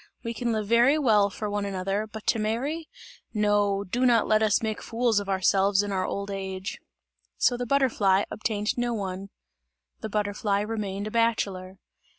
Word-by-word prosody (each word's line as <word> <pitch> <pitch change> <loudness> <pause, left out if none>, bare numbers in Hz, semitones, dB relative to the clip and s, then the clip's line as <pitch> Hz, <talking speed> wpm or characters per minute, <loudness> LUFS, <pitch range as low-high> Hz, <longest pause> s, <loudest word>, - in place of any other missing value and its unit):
We 230 -1 -3
can 235 +1 -2
live 215 -2 -1
very 240 +7 +4
well 215 -8 +3
for 210 +2 -5
one 205 0 -2
another, 195 +2 -2
but 220 0 -9
to 230 - +2
marry? 270 +10 -2 0.5
No! 205 -1 +2
Do 235 +6 -2
not 235 -3 +4
let 215 0 +3
us 215 0 +2
make 220 -1 -2
fools 230 -2 +1
of 200 -1 -6
ourselves 195 +1 +3
in 205 - -4
our 185 -1 -1
old 200 0 -4
age." 190 -1 -5 0.6
So 245 - +3
the 245 0 -4
butterfly 220 -8 +3
obtained 210 +1 -2
no 240 -1 0
one. 195 -1 -5 0.7
The 220 - -5
butterfly 205 0 0
remained 205 -2 -3
a 215 - -5
bachelor. 200 -5 0
210 Hz, 170 wpm, -26 LUFS, 200-230 Hz, 0.7 s, very